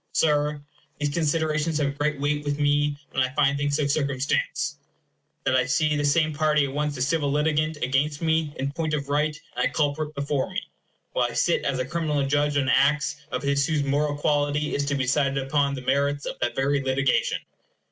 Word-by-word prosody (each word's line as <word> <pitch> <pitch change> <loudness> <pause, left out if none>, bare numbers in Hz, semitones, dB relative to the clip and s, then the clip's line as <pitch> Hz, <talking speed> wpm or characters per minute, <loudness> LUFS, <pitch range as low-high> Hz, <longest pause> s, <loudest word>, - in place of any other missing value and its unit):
Sir, 150 -1 +1 0.4
these 145 -1 -1
considerations 155 0 0
have 140 -2 0
great 145 0 -1
weight 145 +1 0
with 145 -1 -2
me 145 0 +2
when 130 - 0
I 130 0 +1
find 140 -2 +3
things 145 0 0
so 150 -1 +1
circumstanced, 140 -2 -1 0.6
that 130 - +2
I 130 - +2
see 150 -2 +2
the 145 - 0
same 155 +2 +2
party 150 -1 +2
at 135 - -5
once 150 -1 -1
a 125 - 0
civil 145 0 0
litigant 155 +1 +1
against 140 +3 0
me 160 -2 +1
in 135 +1 -2
point 155 0 -1
of 140 -1 -4
right 150 +1 0 0.2
and - - +1
a - - -3
culprit 150 0 -1
before 140 -1 -1
me, - - -4 0.5
while - - +1
I - - -8
sit - - +1
as 135 -1 0
a 130 - -1
criminal 150 -1 -1
judge 145 +1 +1
on 135 -2 +1
acts 140 +2 +2
of - - -2
his 140 0 +1
whose 155 -3 +1
moral 145 +1 0
quality 145 0 0
is 145 - 0
to 145 0 -1
be 135 - 0
decided 135 +1 +1
upon 140 +1 +1
the 130 - -6
merits 140 +2 0
of - - -5
that 120 - -1
very 140 +1 +1
litigation. 135 0 +1
145 Hz, 205 wpm, -25 LUFS, 140-150 Hz, 0.6 s, find